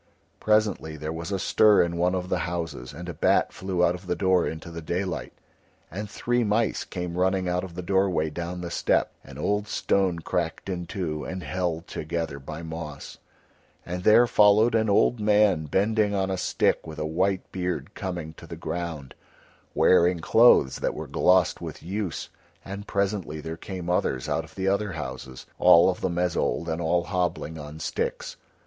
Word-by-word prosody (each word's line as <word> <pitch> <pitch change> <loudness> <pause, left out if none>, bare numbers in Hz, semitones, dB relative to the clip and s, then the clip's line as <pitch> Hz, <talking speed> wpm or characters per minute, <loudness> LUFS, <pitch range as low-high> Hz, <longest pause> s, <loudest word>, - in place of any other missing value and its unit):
Presently 105 -7 +1
there 75 +2 -4
was 85 +4 -5
a 100 - 0
stir 105 +2 +5
in 85 0 -2
one 90 +2 +1
of 90 -1 -3
the - - 0
houses, 80 -8 -4
and 90 +1 -9
a 85 - -4
bat - - +2
flew 90 -2 0
out 85 - +2
of 90 +1 -9
the 90 - 0
door 95 -2 +2
into 80 +1 -6
the 85 0 -7
daylight, 85 -2 -3 0.6
and 105 +5 -5
three 120 +4 0
mice 110 +1 +1
came 90 -1 -5
running 95 0 +1
out 90 0 0
of 90 -3 -8
the 90 - -5
doorway 90 -4 +1
down 85 +2 -5
the 85 -1 -5
step, - - +1
an - - -12
old 105 +1 -1
stone 95 -3 +1
cracked 85 +2 -3
in 90 -2 -4
two 80 -7 -3
and 90 +3 -5
held 85 +2 -2
together 80 -2 -4
by 75 +4 -8
moss; 80 -3 -7 0.7
and 90 +1 -4
there 110 +4 +7
followed 105 +1 +5
an 110 -1 +2
old 110 +4 +3
man 105 -6 +3
bending 105 +5 +1
on 95 -1 0
a - - 0
stick 90 - 0
with 80 - -8
a 75 - -2
white 95 +4 -1
beard 90 +2 -3
coming 90 -6 -5
to - - -13
the - - -7
ground, 80 -4 -5 0.6
wearing 90 -1 +4
clothes 95 - +5
that - - -2
were - - -5
glossed 90 -2 +3
with - - -7
use, 95 0 -4 0.4
and 100 +1 -7
presently 100 -6 -1
there 80 +2 -5
came 90 0 -7
others 90 -7 0
out - - 0
of - - -16
the 95 0 -2
other 100 0 0
houses, 65 -3 -7
all 85 +3 +7
of 90 - -8
them 85 -1 -1
as 90 -1 0
old, 85 - -1
and 80 +1 -2
all 85 +1 +1
hobbling 90 -3 -2
on 75 +1 -9
sticks. - - -3
90 Hz, 185 wpm, -26 LUFS, 80-100 Hz, 0.7 s, there